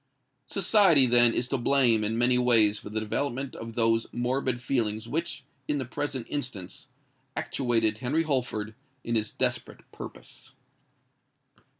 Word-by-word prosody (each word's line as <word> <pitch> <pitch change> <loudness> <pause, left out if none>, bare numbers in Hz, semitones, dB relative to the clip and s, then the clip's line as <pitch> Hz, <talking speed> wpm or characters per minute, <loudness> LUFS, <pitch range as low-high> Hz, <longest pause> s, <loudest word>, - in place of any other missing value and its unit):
Society, 190 - +4
then, 120 -1 +5
is 120 - -2
to 135 - -1
blame 120 -4 +3
in 110 +2 -1
many 125 +1 +3
ways 110 -4 +4
for - - -10
the 110 +1 -2
development 130 +4 -3
of 115 0 -8
those 115 -1 +2
morbid 125 +1 -1
feelings 115 -4 -1
which, 165 +7 -3 0.2
in 145 - 0
the 135 - -3
present 130 -1 -4
instance, 120 -11 -6 0.5
actuated 115 -4 0
Henry 140 +6 0
Holford 120 -7 -2 0.3
in 115 - -3
his 110 -2 0
desperate - - -2
purpose. - - -11
120 Hz, 135 wpm, -27 LUFS, 115-135 Hz, 0.5 s, then